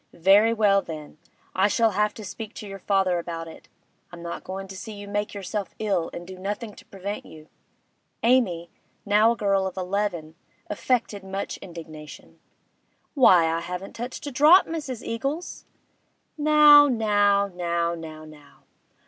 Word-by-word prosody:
Very 195 +6 +5
well, 205 -3 +3
then, 155 -3 -9 0.3
I 190 +2 +3
shall 225 +1 +2
have 210 +1 +1
to 215 - -9
speak 225 +2 -8
to 210 - -8
your 195 0 -8
father 190 -2 +1
about 165 -1 -6
it; 160 - -13 0.4
I'm 175 -1 -10
not 170 - -6
goin' 195 +1 -6
to 190 - -8
see 220 +3 -8
you 205 0 -9
make 205 +1 -3
yourself 200 0 -5
ill 195 -6 -1
and 175 - -8
do 185 0 -10
nothing 210 +3 -4
to - - -16
prevent 200 +2 -6
you.' 155 0 -14 0.7
Amy, 210 -9 +2 0.3
now 210 +3 +4
a - - -10
girl 195 -2 +1
of 190 - -8
eleven, 180 -4 -2 0.4
affected 210 -2 -1
much 195 +1 -5
indignation. 160 -4 -11 0.7
'Why, 185 - +6
I 165 0 0
haven't 180 +3 -6
touched 245 +5 -6
a 285 - -4
drop, 305 +8 +6
Mrs. 290 -8 -5
Eagles!' 275 +9 -4 0.7
'Now, 300 -1 +7
now, 205 -4 +2
now, 170 -1 -1
now, 155 -2 -9
now! 150 -2 -17
200 Hz, 155 wpm, -25 LUFS, 175-220 Hz, 0.7 s, Now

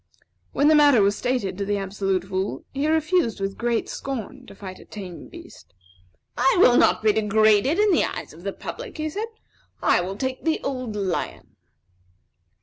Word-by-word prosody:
When 285 - +2
the 310 - +6
matter 290 -7 +6
was 200 +1 +2
stated 245 -7 -2
to - - 0
the 205 0 0
Absolute 195 -1 -1
Fool, 190 +1 -3
he 280 +2 -1
refused 315 - +1
with 195 0 -3
great 235 -1 -1
scorn 265 -7 -6
to - - -12
fight 190 -2 -9
a - - -14
tame 185 -5 -9
beast. - - -14 0.6
"I 265 +2 +3
will 250 -9 +6
not - - +4
be 215 -1 +4
degraded 215 - +3
in 420 0 +4
the 340 - +3
eyes - - -6
of 160 - -14
the 195 +2 -3
public," 470 - -8
he 310 0 -3
said; 425 +7 -3 0.5
"I - - +3
will 190 +3 -5
take 260 +2 -3
the 320 -1 +1
old 255 -5 -4
lion." 195 -4 -3
220 Hz, 180 wpm, -24 LUFS, 195-285 Hz, 0.6 s, the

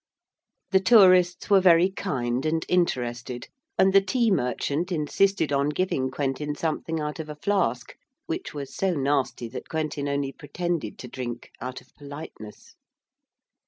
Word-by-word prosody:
The 190 - +5
tourists 185 -4 +5
were 195 -1 +7
very 180 0 +5
kind 130 -10 -2
and 160 +1 0
interested, 125 -8 -1 0.3
and 190 0 +4
the 195 - +7
tea 230 +3 +1
merchant 145 +3 -1
insisted 160 0 +1
on 140 +1 +2
giving 150 -5 0
Quentin 145 +2 -2
something 160 +1 -2
out 150 +1 -4
of 155 -1 -6
a 150 - -6
flask, 150 - -1 0.3
which 340 +2 -4
was 140 -2 -7
so 190 -2 0
nasty 140 -4 0
that 125 - -8
Quentin 155 -3 -2
only 140 -1 -1
pretended 160 -4 -4
to 125 - -8
drink, 120 -1 -6
out 130 +1 -5
of 130 - -25
politeness. 145 -7 -10
150 Hz, 145 wpm, -26 LUFS, 130-180 Hz, 0.3 s, were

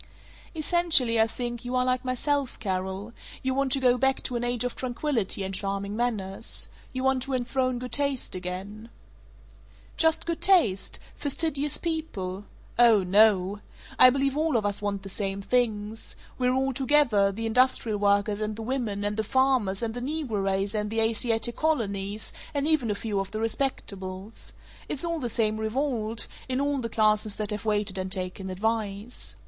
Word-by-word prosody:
"Essentially, 310 -8 +4
I 220 - +4
think, 240 0 -5
you 250 +1 -3
are 250 0 +2
like 255 0 0
myself, 265 +2 -1
Carol; 190 +1 -3 0.3
you 260 0 0
want 275 0 0
to 275 - +4
go 250 -1 +3
back 265 +1 +2
to 250 - -2
an 240 - -1
age 245 -1 +1
of 245 - -3
tranquillity 245 -6 0
and 190 0 -4
charming 200 +1 -2
manners. 215 -4 0 0.2
You 260 0 -4
want 265 -1 +2
to 270 +1 -2
enthrone 255 0 0
good 250 0 -6
taste 280 -3 0
again." 190 +5 -5 1.1
"Just 320 -1 +3
good 335 -1 -3
taste? 230 - +3 0.2
Fastidious 290 0 -1
people? 205 - -4 0.3
Oh 230 -5 +6
no! 200 0 +4 0.4
I 255 - +10
believe 275 +1 0
all 310 -3 +2
of 215 - -1
us 205 0 -1
want 200 -1 -2
the - - -7
same 195 0 -2
things 220 -1 -1 0.2
we're 250 0 +2
all 265 0 +1
together, 255 -7 +3
the 225 +3 -5
industrial 225 -2 +2
workers 205 +1 +2
and 215 0 -2
the 225 - -6
women 220 -5 -2
and 205 +1 -1
the 220 - +1
farmers 240 -4 +2
and 225 -1 -2
the 245 - -5
negro 260 -7 -2
race 195 +1 0
and 210 -1 -1
the 225 +1 -1
Asiatic 225 +1 +1
colonies, 210 -9 -1 0.2
and 285 +1 +1
even 305 -8 +2
a 205 - 0
few 205 -1 -2
of 195 0 -3
the 215 - -5
Respectables. 210 -5 -3 0.4
It's 295 - -2
all 335 -1 -1
the 245 -4 -2
same 215 -1 +1
revolt, 225 -1 -1 0.2
in 255 0 0
all 285 0 0
the 230 -2 -3
classes 215 -1 +2
that 215 -1 -3
have 210 0 -4
waited 205 -2 0
and 185 0 -4
taken 185 0 -3
advice. 210 +2 -3
225 Hz, 175 wpm, -27 LUFS, 205-260 Hz, 1.1 s, I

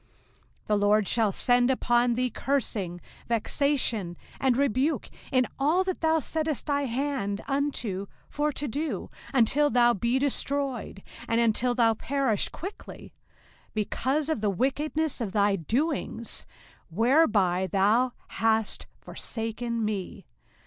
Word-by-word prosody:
05:028:020 - - -39
The 210 - +2
LORD 205 0 +3
shall 220 -3 +2
send 245 +5 +3
upon 240 -2 +2
thee 250 +1 0
cursing, 205 -11 -2 0.3
vexation, 230 - 0 0.2
and 260 -2 +2
rebuke, 280 +3 +1 0.2
in 255 -1 +3
all 315 +7 +3
that 375 -1 -3
thou 320 0 +3
settest 310 0 -2
thine 285 -2 0
hand 245 -5 -2
unto 260 -9 -2 0.2
for 300 +1 -1
to 290 +1 -4
do, 295 +6 -3 0.2
until 275 +4 +3
thou 240 -2 +4
be 235 +4 +1
destroyed, 275 -5 -2 0.2
and 230 - +2
until 235 +2 +2
thou 230 -2 +4
perish 255 -2 0
quickly; 385 +5 -9 0.6
because 265 +7 0
of 315 -9 -1
the 210 - +2
wickedness 290 - -1
of 205 -4 -3
thy 205 -1 +3
doings, 235 - -2 0.4
whereby 205 - +3
thou 220 +6 +3 0.2
hast 220 +1 0
forsaken 225 0 -4
me. 205 -3 -4
245 Hz, 125 wpm, -27 LUFS, 215-280 Hz, 0.6 s, thou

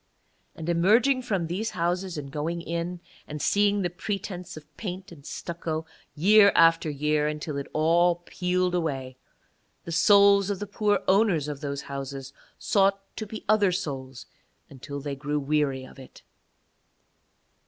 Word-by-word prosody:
And 160 - -7
emerging 220 +10 +3
from 195 -8 -1
these 190 +7 -2
houses 180 +1 -1
and 140 -2 -6
going 160 +3 -3
in, 170 +1 -4 0.3
and 150 - -6
seeing 205 +5 +2
the 175 - 0
pretence 180 -3 -5
of 155 - -10
paint 190 -2 -6
and 150 -5 -13
stucco 160 0 -5 0.3
year 200 +5 +6
after 165 -1 +5
year 150 +1 0
until 150 0 -4
it 140 - -4
all 170 +3 +3
peeled 180 0 -1
away, 135 -7 -2 0.7
the 170 - -7
souls 200 +3 +5
of 200 - -1
the 205 - -5
poor 205 0 0
owners 190 -7 +3
of 145 -1 -5
those 140 -1 -4
houses 135 -1 -6 0.2
sought 195 -1 +2 0.2
to 215 - -5
be 215 +1 -8
other 205 -2 +4
souls 135 -7 -5 0.5
until 140 +1 -7
they 140 0 -4
grew 145 +2 -2
weary 140 -2 0
of 135 - -15
it. 130 - -14
170 Hz, 150 wpm, -26 LUFS, 145-195 Hz, 0.7 s, year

